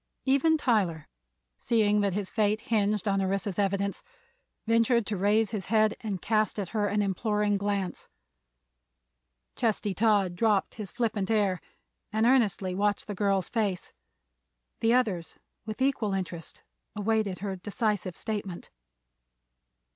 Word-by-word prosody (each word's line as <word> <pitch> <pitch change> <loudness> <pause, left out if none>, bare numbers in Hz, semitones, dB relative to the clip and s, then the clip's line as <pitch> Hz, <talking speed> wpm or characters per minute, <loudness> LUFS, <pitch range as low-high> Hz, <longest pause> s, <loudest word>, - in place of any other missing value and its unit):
Even 280 +4 +3
Tyler, 200 - 0 0.5
seeing 210 -3 +2
that 200 -2 +1
his 200 0 -3
fate 215 0 +1
hinged 210 -1 0
on 195 -1 +2
Orissa's 195 +1 -1
evidence, 200 0 0 0.6
ventured 230 0 +3
to 210 - -2
raise 205 +3 +2
his 210 -5 -4
head 215 -1 +3
and 205 -4 -3
cast 215 +2 +1
at 195 -4 -3
her 210 -2 0
an 205 +1 +1
imploring 210 +1 0
glance. 200 -2 -2 1.5
Chesty 215 -4 0
Todd 205 -4 +2
dropped 210 -1 +1
his 210 -4 -6
flippant 220 -5 -1
air 205 -5 +1 0.5
and 220 +1 +1
earnestly 220 -7 +2
watched 205 +2 0
the 205 - -5
girl's 195 -2 +1
face; 205 -6 -2 0.9
the 225 - +2
others 210 -10 0 0.3
with 220 +4 -2
equal 230 -7 +1
interest 175 -3 -6 0.3
awaited 210 -3 0
her 200 -2 -3
decisive 200 -1 -2
statement. 200 -5 -5
205 Hz, 130 wpm, -28 LUFS, 195-220 Hz, 1.5 s, Even